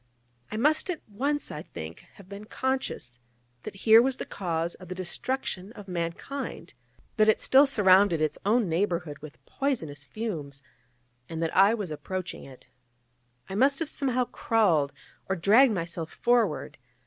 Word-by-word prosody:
I 215 - -3
must 300 - +2
at 345 -4 -2
once, 280 +8 -2
I 150 - -5
think, 80 - -8 0.2
have 200 - -15
been 200 +2 -9
conscious 260 - -3 0.4
that - - -8
here 225 0 +9
was 260 +1 +1
the - - -4
cause 170 -2 -2
of 185 - -13
the 185 - -6
destruction 190 +1 -3
of 205 -3 -11
mankind; 175 - -5 0.4
that 215 0 +5
it 220 - +4
still 275 +2 +5
surrounded 195 - +5
its 155 -1 -1
own 215 +2 +2
neighbourhood 170 -3 -1
with 140 -4 -13
poisonous 165 - -3
fumes; 145 - -5 0.7
and 165 - -5
that 165 - -2
I 200 +4 +6
was 200 -7 -5
approaching 185 +4 -5
it. 130 -2 -14 0.8
I - - -7
must 270 +7 +3
have 325 -3 -2
somehow 255 -4 0
crawled, 175 -14 +1 0.4
or 190 - +1
dragged 215 +7 +5
myself 170 -2 -4
forward. 215 - 0
195 Hz, 155 wpm, -27 LUFS, 165-240 Hz, 0.8 s, here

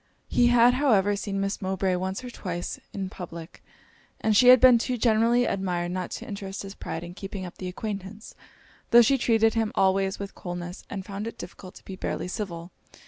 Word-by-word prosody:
He 240 - +4
had, 240 0 +6
however, 215 -7 +3
seen 200 -1 -3
Miss 195 +2 -2
Mowbray 190 0 0
once 190 +6 -3
or 250 - -7
twice 175 -6 -5
in 195 -2 -4
public, 170 -2 -9 0.6
and 215 -1 +1
she 250 +4 +6
had 255 0 +9
been 250 -1 +7
too 250 +1 -2
generally 230 +1 +3
admired 180 -4 -1
not 185 0 -3
to - - -10
interest 200 -1 -6
his 195 0 -8
pride 165 -4 -6
in 175 0 -8
keeping 195 0 -6
up 175 - -10
the 185 - -4
acquaintance, 200 +2 -6 0.6
tho' 240 0 +8
she 270 +4 +3
treated 225 -2 +3
him 225 -2 0
always 190 0 +2
with 200 -1 -7
coldness, 175 0 -7
and 195 -2 -5
found 200 +3 -5
it 230 - -7
difficult 185 -1 -10
to - - -15
be 190 - -7
barely 185 - -3
civil. 180 -3 -5
195 Hz, 195 wpm, -26 LUFS, 185-225 Hz, 0.6 s, had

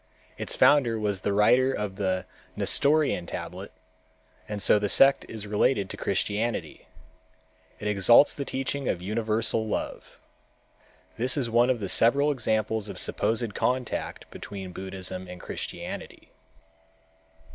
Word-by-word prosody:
Its - - -5
founder 125 -6 +4
was 105 -3 -2
the 100 - -1
writer 125 +6 +4
of 105 -6 -4
the 95 -2 -1 0.3
Nestorian 145 - +2
tablet - - -7 0.8
and 105 -1 -4
so 105 +1 +4
the 105 -1 -1
sect 135 +6 +5
is 110 -2 -7
related 105 -1 +1
to - - -6
Christianity. 110 +3 -2 0.9
It 105 - -4
exalts 105 +7 +5
the 140 - -4
teaching 135 0 -3
of 90 - -2
universal 110 +1 0
love. 105 - -5 1.0
This 125 +3 +3
is 120 -5 -1
one 120 +2 +4
of 110 -7 0
several 140 +6 +3
examples 110 -4 -1
of - - -7
a - - -5
supposed 115 -1 0
contact 125 +2 -2
between 95 -2 -8
Buddhism 95 -1 -4
and 90 0 -9
Christianity. - - -7
110 Hz, 130 wpm, -26 LUFS, 100-125 Hz, 1.0 s, sect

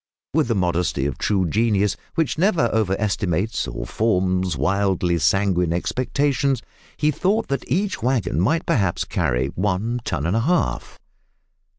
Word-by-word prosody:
With 155 -3 +2
the 115 - 0
modesty 90 -6 0
of 70 -3 -3
true 95 -4 +1
genius, 105 +2 +1 0.2
which 160 -6 0
never 165 - +2
over 105 -4 +1
estimates 100 0 -1
or - - -5
forms 95 -6 0
wildly 90 +2 +1
sanguine 90 -1 +2
expectations, 135 +8 0 0.3
he 150 0 +2
thought 195 +9 0
that 140 - -3
each 200 +3 0
waggon 120 - 0
might 160 - +1
perhaps 95 -7 +1
carry 65 +2 0
one 105 +7 -1
ton 80 -9 -2
and 90 +5 0
a - - +3
half! 115 - 0
100 Hz, 145 wpm, -22 LUFS, 90-130 Hz, 0.3 s, a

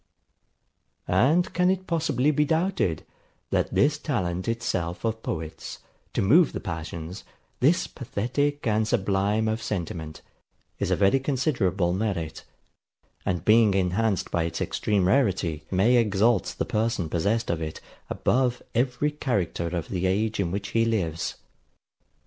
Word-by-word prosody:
And 160 +7 +3
can 180 +1 +3
it 190 0 0
possibly 155 -4 +1
be 150 0 +2
doubted, 160 - 0 0.5
that - - +1
this 145 +1 +3
talent 95 - -2
itself 95 -6 -2
of 110 0 -1
poets, 80 -5 -5 0.4
to - - +1
move 150 - +5
the - - -3
passions, 85 +1 -6 0.4
this 155 +7 +3
pathetic 135 +4 -2
and 110 -1 +1
sublime 100 +2 +1
of 110 +1 -1
sentiment, 85 -6 -5 0.6
is - - -1
a - - +3
very 100 +7 +3
considerable 120 - 0
merit; 95 -6 -2 0.8
and 90 -2 -1
being 110 -2 +5
enhanced 95 +2 0
by 85 -1 +1
its 85 0 -4
extreme 100 -4 0
rarity, 95 - +1
may 100 +7 +3
exalt 110 -1 +2
the - - -1
person 110 -5 0
possessed 100 +8 0
of 85 -1 -2
it, 80 -1 -5 0.3
above 125 -1 +1
every 125 +4 +1
character 100 - -1
of 85 -1 -4
the 95 -1 -1
age 105 +4 0
in 95 -4 +1
which 100 +3 -3
he 115 - +2
lives? 90 -9 -1
105 Hz, 135 wpm, -26 LUFS, 90-125 Hz, 0.8 s, move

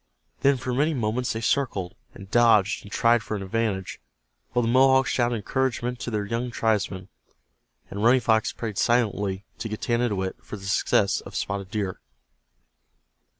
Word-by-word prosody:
Then 140 0 +3
for 125 0 -3
many 150 +5 +1
moments 120 +1 -1
they 115 - -4
circled, 105 -8 0 0.2
and 100 0 -12
dodged, 110 -4 +4
and 100 - -13
tried 115 +1 +3
for 110 0 -4
an 100 - -5
advantage, 100 -2 -2 0.5
while 120 - +1
the - - 0
Mohawks 130 +2 +4
shouted 120 -1 +1
encouragement 125 +2 -2
to - - -4
their 105 -3 -2
young 115 +4 -2
tribesman, 105 -5 -1 0.8
and 100 +2 -4
Running 125 +3 +5
Fox 110 -1 +2
prayed 110 -4 -5
silently 105 -4 +1
to 115 - -4
Getanittowit 110 -3 -1
for 105 - -7
the 100 - -11
success 95 - +2
of - - -11
Spotted 100 -1 -3
Deer. 100 -4 -3
115 Hz, 155 wpm, -25 LUFS, 100-120 Hz, 0.8 s, Running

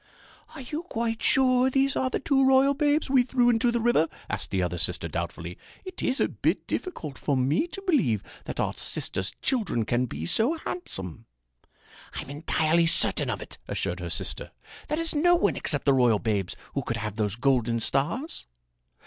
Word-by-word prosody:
"Are - - -7
you 295 +5 -5
quite 230 -9 -3
sure 255 -1 +3
these 270 +1 +1
are 260 - +1
the - - -2
two 270 -1 +2
royal 265 +1 +5
babes 295 +1 +1
we 265 -2 +4
threw 245 -1 +3
into 235 +1 +2
the 235 - 0
river?" 225 -9 +3 0.2
asked 100 0 -3
the 95 -2 0
other 90 0 -2
sister 85 -1 +1
doubtfully. 85 +1 -5 0.3
"It 370 -1 -8
is 260 +1 0
a - - +3
bit - - -1
difficult 155 - -5
for 140 -3 0
me 140 - +1
to 390 +3 -8
believe 235 - +1 0.2
that - - -6
our - - 0
sister's 95 0 -2
children 210 - 0
can 120 +3 0
be 80 -6 -5
so 230 - +3
handsome." 95 - -5 0.9
"I'm - - -6
entirely 160 +2 +1
certain 165 - +3
of - - -3
it," - - -12
assured - - -2
her - - -5
sister. - - -2 0.4
"There 300 - -1
is 330 -1 +2
no 350 +4 +4
one 340 - +2
except 145 - 0
the 140 - +5
royal 125 -4 +4
babes 100 -4 -2 0.2
who 140 - -1
could 115 -2 -3
have 105 -2 -4
those 105 -2 0
golden 120 -2 +1
stars." 150 - -2
170 Hz, 185 wpm, -26 LUFS, -, 0.9 s, royal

